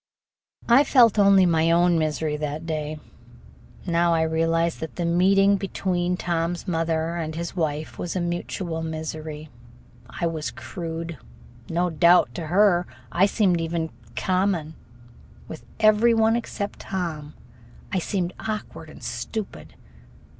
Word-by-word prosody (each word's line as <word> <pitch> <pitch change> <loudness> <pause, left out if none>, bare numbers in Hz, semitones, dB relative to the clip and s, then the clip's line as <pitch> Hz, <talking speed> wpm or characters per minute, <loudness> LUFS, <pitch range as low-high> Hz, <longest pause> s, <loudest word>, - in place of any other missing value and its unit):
I 240 +4 +6
felt 235 -7 +5
only 195 -2 +6
my 165 -1 +2
own 170 0 +4
misery 155 -1 -1
that 150 +2 -4
day. 155 -1 -3 0.9
Now 170 -1 +2
I 160 - +2
realize 165 +1 +1
that 160 - -7
the 175 - -2
meeting 195 +4 +4
between 180 -2 -1
Tom's 170 +1 -2
mother 165 -1 -1
and 160 -2 -4
his 170 +2 -5
wife 155 -3 -3
was 175 - -4
a - - 0
mutual 175 -1 -3
misery. 155 -1 -6 0.6
I - - -3
was 160 -2 -2
crude. 165 +4 -6 0.5
No 175 +1 0
doubt, 170 +3 +4
to 165 -3 -5
her, 180 0 +3 0.2
I 190 +3 +4
seemed 190 -5 +2
even 165 -1 -2 0.2
common. 185 0 0 0.7
With 160 - -9
every 220 +2 +5
one 225 0 +3
except 225 -3 -4
Tom 160 -6 -5 0.6
I 190 - +2
seemed 180 0 -2
awkward 165 -7 -5
and - - -13
stupid. 195 - -6
170 Hz, 130 wpm, -24 LUFS, 160-185 Hz, 0.9 s, I